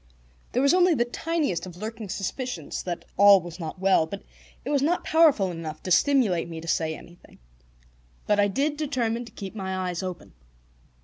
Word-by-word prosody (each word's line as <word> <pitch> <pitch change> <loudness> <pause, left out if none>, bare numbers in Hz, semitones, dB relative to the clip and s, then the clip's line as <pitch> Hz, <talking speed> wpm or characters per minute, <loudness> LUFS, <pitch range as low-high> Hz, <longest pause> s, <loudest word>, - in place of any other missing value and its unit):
There 255 - +2
was 280 - +5
only 360 -2 +4
the 240 - +1
tiniest 290 - -2
of 175 -1 -11
lurking 220 +1 -6
suspicions 195 - -4
that 175 -2 -5
all 200 0 +8
was 175 0 -9
not 160 +1 -6
well, 190 -4 +3
but 200 +4 -7 0.4
it 280 - -2
was 285 -2 +2
not 335 +5 +1
powerful 300 - +4
enough 160 -2 -7
to 185 - -4
stimulate 205 - +3
me 165 -1 -6
to 165 - -10
say 160 -1 0
anything. 175 +2 -16 0.9
But 210 -1 +2
I 205 - +4
did 285 +9 -1
determine 245 -6 -1
to 230 - -13
keep 195 -2 -8
my 190 -3 -4
eyes 180 -1 -2
open. 185 -2 -7
200 Hz, 185 wpm, -26 LUFS, 175-265 Hz, 0.9 s, all